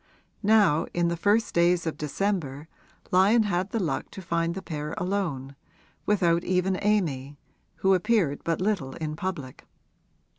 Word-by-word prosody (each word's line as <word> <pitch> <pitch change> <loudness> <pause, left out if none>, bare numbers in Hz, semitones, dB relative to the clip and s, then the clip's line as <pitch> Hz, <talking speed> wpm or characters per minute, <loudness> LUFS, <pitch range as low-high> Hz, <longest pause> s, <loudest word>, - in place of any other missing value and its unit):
Now, 205 -7 +4
in 175 -1 +2
the 170 - -1
first 205 +6 +1
days 170 0 +3
of 160 - -2
December, 150 -2 -2 0.4
Lyon 200 +5 +5
had 185 -2 -1
the 230 - -2
luck 160 -8 -2
to 195 - -9
find 170 0 -1
the 190 - -5
pair 150 -1 -5
alone, 170 -8 -2 0.5
without 175 -4 +2
even 185 +1 0
Amy, 150 -10 0 0.4
who 190 0 +2
appeared 185 -6 +1
but 165 -1 -1
little 185 -10 -1
in 155 -2 -4
public. 155 -8 -6
175 Hz, 145 wpm, -26 LUFS, 155-195 Hz, 0.5 s, Lyon